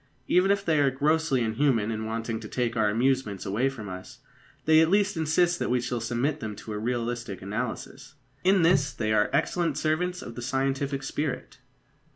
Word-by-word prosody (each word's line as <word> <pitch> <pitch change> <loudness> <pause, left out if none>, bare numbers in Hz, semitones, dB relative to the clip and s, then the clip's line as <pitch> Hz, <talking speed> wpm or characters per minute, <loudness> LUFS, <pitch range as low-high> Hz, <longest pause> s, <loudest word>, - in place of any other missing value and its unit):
Even 180 +2 +4
if 200 0 +1
they 160 -3 +3
are 140 -1 +4
grossly 145 -1 +1
inhuman 115 -1 +1
in 110 0 -3
wanting 115 0 -3
to 110 - -8
take 120 0 -1
our 110 -2 +2
amusements 120 -3 0
away 115 +8 +1
from 115 -6 -8
us, 95 -1 -8 0.5
they 155 0 +6
at 160 - +3
least 200 +1 +2
insist 170 +2 +2
that - - -1
we 125 0 +2
shall 120 -1 -3
submit 120 +6 -1
them 110 -5 -5
to 110 - -8
a 105 - -3
realistic 120 -3 -3
analysis. 100 +7 -5 0.3
In 190 -1 +4
this 165 -4 +3
they 110 -2 -1
are 105 -1 +3
excellent 165 -5 0
servants 175 +4 -1
of 120 - -8
the 120 - -7
scientific 135 +2 -1
spirit. 145 +1 -4
130 Hz, 190 wpm, -27 LUFS, 110-155 Hz, 0.5 s, they